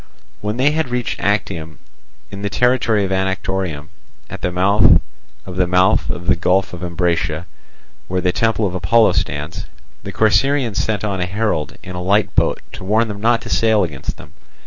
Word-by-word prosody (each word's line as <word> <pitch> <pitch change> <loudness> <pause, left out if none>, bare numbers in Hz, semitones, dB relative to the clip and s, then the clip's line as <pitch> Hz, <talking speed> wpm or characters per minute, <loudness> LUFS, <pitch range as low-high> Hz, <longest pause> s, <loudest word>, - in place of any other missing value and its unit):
When 105 +2 -3
they 135 +3 +3
had 160 -3 -1
reached 125 -1 -2
Actium 95 -6 -2 0.5
in 100 - -7
the 100 - -2
territory 120 -3 +2
of 95 - -4
Anactorium, 95 -5 -2 0.4
at - - -7
the 90 - -1
mouth 95 +3 +5 0.5
of 90 -1 -8
the 90 -1 +2
mouth 90 +1 +3
of 85 - -4
the 90 - +3
Gulf 90 +1 +1
of 90 - -7
Ambracia, 85 -2 -1 0.6
where 90 - -1
the 90 0 +1
temple 110 +1 +1
of 95 - -2
Apollo 115 +5 +3
stands, 75 +2 -3 0.3
the - - -7
Corcyraeans 110 +2 +2
sent 105 -2 -1
on 100 -3 -2
a 90 - -1
herald 100 -5 -2
in 90 - -8
a 90 - -5
light 100 +3 +1
boat - - +2
to - - -9
warn 110 +4 +1
them 100 -1 -6
not 115 +1 +2
to - - -8
sail 110 -2 +3
against 75 -6 -5
them. - - -14
95 Hz, 185 wpm, -19 LUFS, 90-110 Hz, 0.6 s, mouth